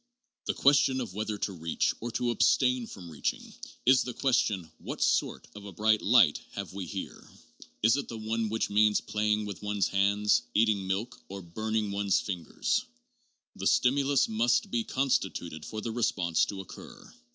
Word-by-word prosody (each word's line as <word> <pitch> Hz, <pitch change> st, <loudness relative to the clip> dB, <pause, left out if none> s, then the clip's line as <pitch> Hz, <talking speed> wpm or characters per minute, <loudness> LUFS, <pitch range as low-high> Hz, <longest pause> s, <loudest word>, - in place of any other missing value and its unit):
The -, -, 0 dB
question 140 Hz, -2 st, +4 dB
of 120 Hz, -7 st, -5 dB
whether 105 Hz, +1 st, -3 dB
to 100 Hz, -, -3 dB
reach 80 Hz, -2 st, -1 dB
or 120 Hz, -, -4 dB
to 120 Hz, +1 st, 0 dB
abstain 125 Hz, +1 st, +2 dB
from 90 Hz, -4 st, -10 dB
reaching 75 Hz, -, -3 dB, 0.3 s
is 130 Hz, +1 st, +6 dB
the 125 Hz, -, -5 dB
question 105 Hz, -, 0 dB
what -, -, -6 dB
3 -, -, +2 dB
68 -, -, +4 dB
JOHN -, -, -6 dB
DEWEY. -, -, -7 dB
sort -, -, -17 dB
of 105 Hz, -1 st, -11 dB
a 100 Hz, -, -8 dB
bright 110 Hz, +3 st, +2 dB
light 115 Hz, -9 st, +5 dB
have 100 Hz, -2 st, -6 dB
we 95 Hz, -2 st, -5 dB
here? -, -, -7 dB, 0.5 s
Is 115 Hz, +4 st, +5 dB
it 140 Hz, -, -3 dB
the 115 Hz, -, -6 dB
one 110 Hz, 0 st, -2 dB
which 110 Hz, -1 st, -1 dB
means 105 Hz, 0 st, +4 dB
playing 105 Hz, 0 st, -1 dB
with 100 Hz, -2 st, -7 dB
one's 105 Hz, -1 st, 0 dB
hands, 100 Hz, +1 st, +2 dB
eating 105 Hz, -3 st, +2 dB
milk, 105 Hz, +6 st, -3 dB
or 100 Hz, 0 st, -7 dB
burning 110 Hz, +4 st, -2 dB
one's 100 Hz, -1 st, +1 dB
fingers? 90 Hz, -, -2 dB, 0.7 s
The -, -, -2 dB
stimulus 140 Hz, +1 st, +3 dB
must 120 Hz, +2 st, +1 dB
be 115 Hz, -1 st, 0 dB
constituted 95 Hz, -, -1 dB
for 110 Hz, -, -5 dB
the 115 Hz, -, -4 dB
response 95 Hz, -8 st, +1 dB
to 100 Hz, -1 st, -6 dB
occur. 95 Hz, -, -12 dB
105 Hz, 185 wpm, -29 LUFS, 100-120 Hz, 0.7 s, is